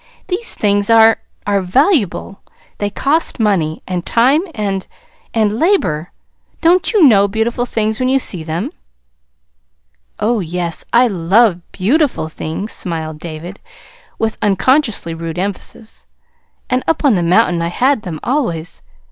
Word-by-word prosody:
These 405 +6 -1
things 205 0 +1
are 225 0 +6 0.3
are 200 -1 +1
valuable. 205 - +1 0.4
They 205 - -1
cost 280 +8 0
money, 180 -8 0
and 180 -2 -3
time 255 - +3
and 200 -3 -2 0.4
and 220 -1 0
labor. 180 - +1 0.5
Don't 350 +2 +3
you 425 -6 +4
know 205 -8 +6
beautiful 230 +4 -1
things 220 0 -1
when 255 0 +1
you 270 - +3
see 185 -10 -2
them?" 160 +3 -3 1.5
"Oh, 230 +1 +1
yes, 175 -1 -3
I 240 +2 +5
love 195 -1 +2
BEAUTIFUL 245 - 0
things," 160 +7 -5
smiled 160 -3 -4
David, 170 +4 -8 0.6
with 220 -1 -2
unconsciously 225 - +1
rude 165 0 -6
emphasis. 200 +3 -6 0.6
"And 255 0 0
up 325 -2 0
on 275 - +5
the 180 - +1
mountain 175 0 +2
I 170 - -1
had 255 +8 +1
them 170 -6 -6
always. 175 - -2
205 Hz, 135 wpm, -16 LUFS, 175-250 Hz, 1.5 s, are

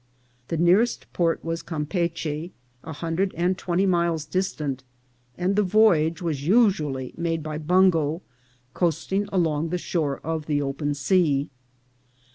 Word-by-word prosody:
The 165 - -2
nearest 180 +8 +3
port 165 -2 0
was 165 0 -2
Cam 155 -3 -4
peachy, 170 -1 -3 0.3
a 160 - -7
hundred 165 +5 -2
and 180 +2 +1
twenty 180 +1 0
miles 170 -4 +1
distant, 150 -6 -2 0.5
and 185 +2 0
the 210 - +4
voyage 180 -5 +3
was 150 -5 -2
usually 155 - +2
made 165 -2 -1
by 155 -1 -4
bungo, 165 -1 +2 0.5
coasting 180 +4 -1
along 165 -4 0
the 180 - -1
shore 155 -5 -2
of 160 -1 -3
the 150 -2 +1
open 145 +1 -2
sea. 145 -1 +1
165 Hz, 135 wpm, -24 LUFS, 150-185 Hz, 0.5 s, the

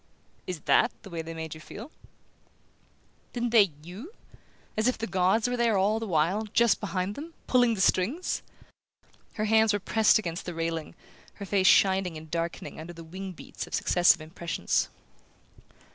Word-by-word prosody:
"Is 180 -4 -4
THAT 235 - +3
the 195 - -11
way 165 -1 -3
they 165 0 -8
made 160 -1 -5
you 155 - -11
feel?" 230 - -10 1.4
"Didn't 240 -1 -1
they 205 -6 +6
YOU?...As 220 - -7
if 255 - +1
the 225 - -3
gods 190 +4 +2
were 245 - -1
there 235 -4 +2
all 205 +3 +2
the 225 - -4
while, 180 +5 +1
just 235 -1 +4
behind 195 -1 -2
them, 320 +7 -9
pulling 245 -2 +3
the 190 - -2
strings?" 230 - +1 0.9
Her 215 - -2
hands 220 0 +4
were 205 - 0
pressed 220 +3 +4
against 175 -5 -4
the 175 - -4
railing, 165 -1 -3 0.4
her 200 - -7
face 190 -1 +2
shining 190 -4 +4
and 155 0 -11
darkening 170 -1 -4
under 165 +2 -8
the 165 0 -10
wing 185 +3 -7
beats - - -8
of - - -3
successive 175 -2 +4
impressions. 165 +1 -2
190 Hz, 165 wpm, -28 LUFS, 170-220 Hz, 1.4 s, they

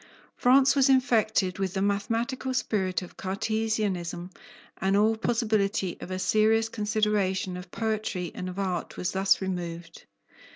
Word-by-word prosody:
France 265 +2 +5
was 275 -1 +4
infected 220 -8 +2
with 190 -1 -2
the 190 - 0
mathematical 230 +6 -1
spirit 190 -7 0
of 180 - -12
Cartesianism 195 -3 -2 0.5
and 195 +2 +2
all 215 +2 +3
possibility 215 -5 0
of - - -7
a 185 - -3
serious 220 +3 +2
consideration 210 -4 0
of 180 0 -8
poetry 215 -4 -2
and 185 - -5
of 180 - -8
art 185 -3 -3
was 180 - -2
thus 190 +1 +2
removed. 170 -3 -5
200 Hz, 135 wpm, -27 LUFS, 185-220 Hz, 0.5 s, France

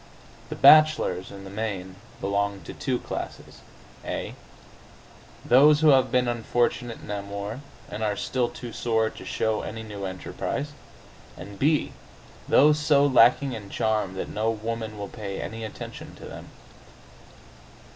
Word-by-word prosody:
The - - -4
bachelors, 155 - +5
in 100 -1 -10
the 95 - -9
main, 100 -3 -4 0.2
belong 100 0 -1
to - - -9
two 130 -2 -1
classes: - - -7 0.4
(a) - - -4 1.1
those 145 +4 +6
who 155 - +6
have 135 -2 +4
been 125 -1 +2
unfortunate 120 0 -1
in - - -7
amour, 100 +3 -5 0.3
and 105 - -7
are 105 -1 0
still 120 +3 -1
too 120 -2 -9
sore 110 -2 0
to - - -11
show 110 -1 -1
any 110 +1 -6
new 105 -2 -6
enterprise, 95 +9 -4 0.7
and 100 +2 -10
(b) 150 +2 +2 0.6
those 150 +2 +5
so 145 -1 +4
lacking 130 0 +5
in 105 -3 -7
charm 105 -4 -1
that - - -4
no 110 +1 -1
woman 110 0 -4
will 100 -1 -5
pay 100 -2 -6
any 115 +1 -5
attention 110 - -8
to - - -12
them. - - -10
110 Hz, 145 wpm, -26 LUFS, 100-125 Hz, 1.1 s, those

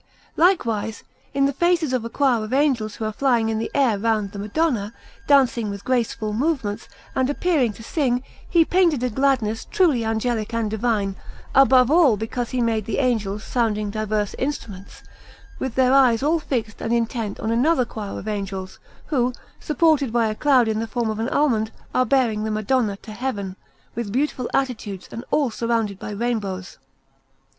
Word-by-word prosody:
Likewise, 230 - +1 0.3
in 275 0 +2
the 280 - +1
faces 345 -2 +1
of 250 -3 0
a 230 - -5
choir 250 -4 +1
of 215 - -6
angels 260 -7 +1
who 220 - -4
are 215 - -2
flying 240 -3 +2
in 220 0 -1
the 225 - -3
air 245 -8 +3
round 215 -2 0
the 200 - -7
Madonna, 215 -1 -1 0.3
dancing 255 -6 +3
with 200 0 -6
graceful 230 -4 -1
movements, 235 -5 -1 0.2
and 260 0 +1
appearing 290 -6 +1
to 225 - -12
sing, 250 -2 0 0.3
he 335 -2 +4
painted 340 -8 +2
a 250 - 0
gladness 240 -3 +1
truly 325 - +2
angelic 225 0 -1
and 225 -2 -1
divine, 215 -3 0 0.4
above 265 -1 +5
all 305 -10 +5
because 225 +3 -3
he 255 - -1
made 225 -3 0
the 220 - -2
angels 220 -6 0
sounding 215 -4 -1
diverse 215 -1 -1
instruments, 215 -9 -5 0.6
with 260 -3 -3
their 260 0 +4
eyes 260 -3 +4
all 320 +3 +2
fixed 230 -7 -3
and 225 - -2
intent 230 -3 -1
on 220 - -2
another 255 +3 +3
choir 210 -3 -6
of - - -8
angels, 195 -3 -4 0.3
who, 255 -4 +1 0.3
supported 300 -4 +2
by 235 -1 +2
a 215 - 0
cloud 255 0 +3
in 220 -1 0
the 225 - -2
form 235 -2 -1
of 215 - -5
an 230 +3 -1
almond, 230 -7 +1 0.2
are 255 0 +2
bearing 230 -5 +2
the 220 - -2
Madonna 215 0 0
to 220 - -9
Heaven, 210 -5 -4 0.4
with 230 -3 -4
beautiful 255 0 -1
attitudes 225 -8 -2
and 230 - -6
all 280 -5 +1
surrounded 225 -4 -1
by - - -6
rainbows. 205 -4 -3
230 Hz, 175 wpm, -22 LUFS, 215-265 Hz, 0.6 s, above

